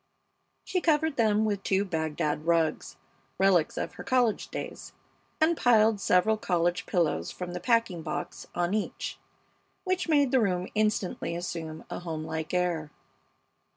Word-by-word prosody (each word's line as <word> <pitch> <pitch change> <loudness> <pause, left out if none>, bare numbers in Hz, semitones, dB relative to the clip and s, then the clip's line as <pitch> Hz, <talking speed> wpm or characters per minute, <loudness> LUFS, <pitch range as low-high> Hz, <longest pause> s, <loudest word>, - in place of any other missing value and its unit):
She 365 - -1
covered 315 -2 +2
them 220 -2 +3
with 205 -2 -1
two 195 +1 +1
Bagdad 160 -3 -2
rugs, 165 -2 +1 0.4
relics 185 -4 +3
of - - -3
her - - -9
college 245 -4 +1
days, - - -7 0.5
and 325 +2 +4
piled 220 -6 +4
several 200 +5 +3
college 175 -3 0
pillows 170 -4 0
from 180 -1 -6
the 180 - -3
packing 230 -6 +1
box 155 -1 -5
on 175 +2 0
each, 215 -1 -3 0.6
which 370 -2 -1
made 285 -4 +4
the 260 - +4
room 180 -3 0
instantly 210 -5 0
assume 165 -2 -5
a - - -3
homelike 160 -1 -4
air. 175 -4 0
185 Hz, 140 wpm, -28 LUFS, 170-225 Hz, 0.6 s, and